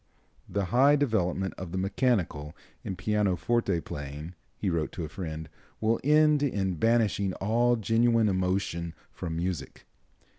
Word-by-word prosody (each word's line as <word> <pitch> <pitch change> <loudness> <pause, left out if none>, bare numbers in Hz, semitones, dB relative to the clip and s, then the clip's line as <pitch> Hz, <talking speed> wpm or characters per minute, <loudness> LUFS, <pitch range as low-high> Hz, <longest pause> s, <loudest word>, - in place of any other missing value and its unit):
"The 100 -1 -1
high 140 +4 +6
development 95 -9 0
of 90 -3 -6
the 95 - -3
mechanical 95 - 0 0.3
in 95 - -4
pianoforte 100 0 +1
playing," 75 +3 -7 0.2
he 100 - -3
wrote 85 -4 0
to 85 - -4
a - - -3
friend, 80 -1 -6 0.3
"will 110 +1 +1
end 150 +1 +5
in 100 -9 0
banishing 110 -3 +2
all 120 +6 +2
genuine 115 0 +3
emotion 90 -3 -1 0.2
from 80 - -5
music." 85 -2 -4
95 Hz, 135 wpm, -28 LUFS, 85-115 Hz, 0.3 s, high